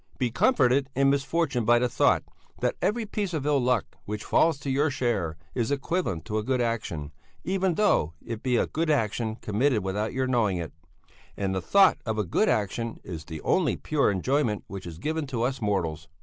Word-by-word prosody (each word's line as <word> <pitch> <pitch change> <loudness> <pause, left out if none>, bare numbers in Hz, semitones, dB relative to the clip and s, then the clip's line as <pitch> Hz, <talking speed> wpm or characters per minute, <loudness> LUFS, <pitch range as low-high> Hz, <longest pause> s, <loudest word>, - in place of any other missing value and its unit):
Be 125 -3 0
comforted 135 - +3
in 135 +1 +4
misfortune 140 -2 0
by 120 +2 +5
the 125 +1 +2
thought 120 - +2 0.4
that - - 0
every 225 +2 0
piece 200 -4 -3
of 145 -3 -3
ill 145 -2 +2
luck 125 -3 +2 0.2
which 105 +1 -4
falls 160 -3 +3
to 140 - -2
your 145 +3 +2
share 105 - -1 0.2
is 120 -1 -1
equivalent 140 - -1
to 110 0 -1
a - - -3
good 130 +2 0
action, 110 -11 -2 0.3
even 190 -1 0
though 85 - +2
it 115 -2 -5
be 125 -2 +1
a - - +2
good 165 +1 -2
action 110 -5 0
committed 110 +1 0
without 105 +3 -2
your 130 +1 -1
knowing 115 -7 +1
it; 85 -2 -5 0.6
and 95 -1 -1
the 95 - -1
thought 195 - +5
of 110 -2 -2
a 105 - +1
good 210 - +2
action 110 +2 -1
is 80 -4 -7
the 80 -2 -7
only 185 -4 +1
pure 150 -2 +1
enjoyment 110 +3 0
which 95 -2 -8
is 80 -2 -8
given 155 - -2
to 120 -4 -2
us 130 +1 -1
mortals." 85 -7 -1
120 Hz, 200 wpm, -27 LUFS, 105-145 Hz, 0.6 s, by